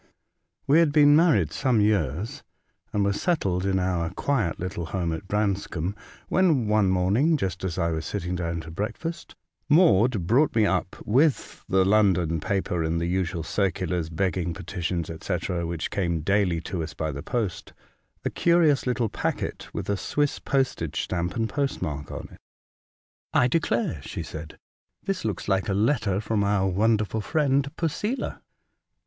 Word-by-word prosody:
WE 145 +4 +5
had 165 -3 +4
been 145 -1 +6
inarried 150 - +4
some 125 - +1
years, 100 - 0 0.5
and 105 -1 +1
were 100 - +2
settled 100 - 0
in 95 -1 +2
our 90 -3 0
quiet 105 - -1
little 85 -2 -4
home 85 -2 -2
at 95 +4 -6
Branscombe, 100 -3 -1 0.3
when 160 - +2
one 105 -2 +3
morning, 100 - +3
just 95 -7 -3
as 90 -3 -2
I 85 -2 +1
was 80 0 -2
sitting 90 0 -3
down 85 -1 -2
to 80 0 -10
breakfast, 115 - -5 0.3
Maude 125 - +4
brought 130 - +3
me 110 -2 +4
up 95 -1 0
with 135 +6 +1
the 95 0 +3
London 95 -5 +3
paper, 95 0 -1
and 80 +1 0
the 85 - -1
usual 90 -1 -1
circulars, 90 -3 -1
begging 90 0 -1
petitions, 90 -3 -3
&c., 95 - 0 0.3
which 85 -1 -3
came 85 -5 -1
daily 95 -1 +1
to 90 -1 -4
us 80 +1 -6
by 80 -1 -2
the 70 0 -6
post, 110 - -3 0.5
a - - 0
curious 165 -6 +3
little 125 -2 +1
packet - - -3
with - - -5
a 100 - 0
Swiss 145 +7 -1
postage 130 - -1
stamp 85 0 -2
and 115 -1 0
post 140 +2 -2
mark 75 -2 -4
on - - -6
it. - - -15 1.0
I 125 - +5
declare," 120 - 0
she - - -6
said, 80 0 -8 0.2
'' - - -54
this 195 -2 -2
looks 105 -5 -3
like 95 0 +1
a 95 - +1
letter 110 -3 +1
from 110 -1 0
our 100 -1 +2
wonderful 105 +3 +1
friend, 140 +1 +1
Posela." 205 - -2
100 Hz, 165 wpm, -26 LUFS, 85-120 Hz, 1.0 s, been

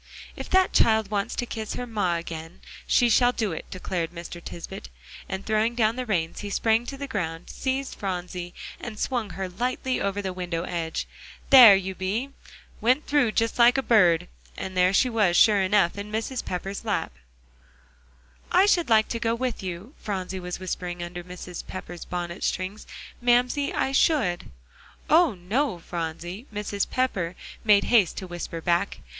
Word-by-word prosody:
"If - - -7
that 375 0 +3
child 220 -2 +3
wants 200 -1 -1
to 245 - -2
kiss 220 -2 -5
her 245 - -4
ma 205 -7 0
agen, 165 +1 -7 0.3
she 245 - +4
shall 245 +1 +4
do 220 -5 -2
it," 160 - -7
declared 180 -2 -3
Mr. 170 0 -9
Tisbett; 165 - -8 0.4
and 190 +1 -4
throwing 220 +2 +1
down 225 -1 +2
the 255 -1 -4
reins, 165 -6 -1
he 205 - -5
sprang 225 +3 +1
to 275 - -6
the 280 - -4
ground, 165 -9 -4
seized 265 0 -2
Phronsie, 180 -2 -4 0.2
and 220 -3 -7
swung 240 -2 -1
her 190 +1 -4
lightly 250 +6 -2
over 200 0 -1
the 190 -2 -3
window 175 -2 -3
edge. 165 -2 -3 0.5
"There 245 -7 +11
you 190 0 -2
be 210 +9 -2 0.5
went 255 +6 +2
through 280 -7 +2
just 230 +1 0
like 240 +2 +6
a 270 - +1
bird." 180 -9 +4 0.3
And 190 - -5
there 180 0 +4
she 225 +6 +4
was, 210 -7 +2
sure 210 -3 +6
enough, 190 -2 +3
in 205 +1 -6
Mrs. 225 +3 -2
Pepper's 195 +2 -4
lap. - - -2 1.4
"I 370 +2 +6
should 350 -8 +2
like 220 -1 +5
to 230 - -2
go 230 0 0
with 250 -1 -3
you," 185 - -6
Phronsie 190 -2 -4
was 180 0 -5
whispering 180 -1 -4
under 175 0 -6
Mrs. 180 0 -8
Pepper's 175 -2 -7
bonnet 175 +1 -5
strings, 185 +4 -3 0.3
"Mamsie, 245 +4 +2
I 265 - 0
should." 265 - +2 0.6
"Oh, 320 - +5
no, 195 +6 -1
Phronsie!" 175 - -5
Mrs. 205 -1 -2
Pepper 190 -10 -1 0.3
made 210 -2 +5
haste 215 -7 +3
to 190 - -4
whisper 175 -2 -6
back. 170 - 0
200 Hz, 170 wpm, -25 LUFS, 180-240 Hz, 1.4 s, There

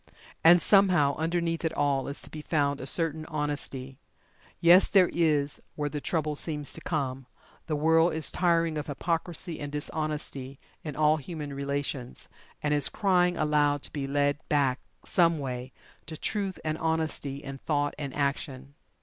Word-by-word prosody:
And 170 0 +7
somehow, 180 -8 +4
underneath 165 +1 -1
it 165 - 0
all 140 -2 +1
is 140 - -4
to - - -9
be 155 - -7
found 145 -3 0
a 130 - -4
certain 160 0 +2
Honesty 145 -3 -4 0.6
yes, 175 +3 +7
there 185 -3 +4
is 150 -4 +1
where 145 -1 -2
the 150 0 -5
trouble 155 -6 -1
seems 150 -1 -2
to - - -7
come, 135 -5 -3 0.4
the 155 - 0
world 160 +3 +4
is 160 - +1
tiring 165 -3 +1
of 150 - -6
hypocrisy 165 +3 -2
and 145 -1 -5
dishonesty 150 -3 -4 0.2
in 150 -3 -5
all 155 0 +3
human 150 -1 -6
relations, 140 -2 -3 0.3
and 150 0 +1
is 145 -2 +4
crying 180 -3 +2
aloud 150 -2 +2
to - - -8
be 140 -2 -3
led 145 +1 +1
back, 140 -3 +2 0.3
someway, 135 -7 +1 0.4
to 155 0 -6
Truth 200 0 -2
and 155 0 -1
Honesty 160 -3 -1
in 135 -1 -7
Thought 145 -1 0
and 140 -2 -4
Action. 140 -1 -2
150 Hz, 160 wpm, -28 LUFS, 140-165 Hz, 0.6 s, And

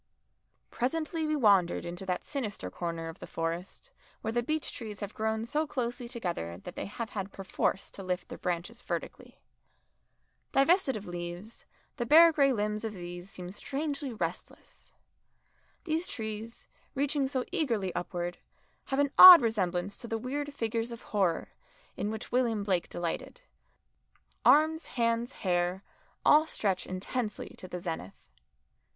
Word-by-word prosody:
Presently 315 +5 -1
we 305 - +1
wandered 200 -10 +3
into 175 +2 -6
that 180 -1 -1
sinister 210 - -4
corner 165 - -4
of 165 +3 -8
the - - -8
Forest 165 +3 -4 0.3
where 220 - -2
the 240 +1 +1
beech 310 +4 -2
trees 215 -4 -7
have 205 0 -5
grown 220 -1 -1
so 305 +6 0
closely 245 -3 -3
together 175 - -4
that 95 - -9
they - - -4
have 220 +2 -5
had 195 -1 -4
perforce 195 0 -2
to - - -9
lift 185 -1 -3
their - - -8
branches 180 +7 -3
vertically. - - -6 1.1
Divested 275 - +4
of 210 - -8
leaves, 175 +4 -6 0.3
the 240 -3 -2
bare 330 +4 +9
grey 280 -3 +4
limbs 210 -2 -1
of 220 -1 -3
these 175 0 -8
seem 180 -2 -7
strangely 280 +5 -3
restless. 225 - -6 0.9
These 325 +1 -1
trees, 220 +1 -6 0.3
reaching 280 0 +1
so 260 -2 -1
eagerly 225 - 0
upward, 175 0 -3 0.5
have 270 - -2
an 285 -1 +2
odd 365 -6 +13
resemblance 195 -4 0
to 235 - -7
the 225 - -1
weird 285 +5 -3
figures 230 -3 -2
of 235 - -8
horror 190 -5 0 0.4
in 205 - -2
which 220 0 -5
William 235 -4 +1
Blake 185 -4 0
delighted 175 - -4 1.0
arms, 315 +2 +5
hands, 235 +1 +1
hair, 180 +1 +1 0.4
all 310 +2 +6
stretch 195 -10 -1
intensely 210 +4 -3
to 185 - -7
the 180 0 -5
zenith. 160 - -6
220 Hz, 145 wpm, -30 LUFS, 180-265 Hz, 1.1 s, odd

